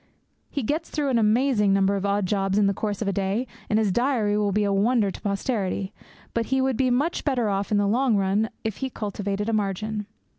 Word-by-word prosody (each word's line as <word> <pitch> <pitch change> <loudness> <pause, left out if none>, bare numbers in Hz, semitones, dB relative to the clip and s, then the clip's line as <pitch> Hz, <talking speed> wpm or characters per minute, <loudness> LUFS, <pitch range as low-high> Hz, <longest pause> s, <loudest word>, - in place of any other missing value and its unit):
He 280 - -3
gets 305 +8 -2
through 295 -3 -1
an 245 -3 +2
amazing 215 -2 +3
number 195 0 +3
of 200 0 -1
odd 200 0 +1
jobs 195 0 0
in 210 - +4
the 200 - +2
course 205 +1 -3
of - - -4
a 200 - +1
day, 200 +5 -1 0.2
and 215 - +2
his 215 -3 +2
diary 240 -2 +1
will 210 -1 +1
be 210 +2 +1
a 200 -1 +1
wonder 210 0 +2
to - - -10
posterity. 200 -2 -2 0.4
But 230 -1 -1
he 265 - +1
would 265 -1 +1
be 255 +2 +2
much 280 +7 0
better 250 -7 +1
off 200 +1 -2
in 210 - +3
the 205 - +2
long 235 +3 +2
run 200 +3 +1
if 220 -2 -3
he 265 - -3
cultivated 205 -2 -3
a 225 - 0
margin. 210 0 -2
210 Hz, 230 wpm, -25 LUFS, 200-245 Hz, 0.4 s, in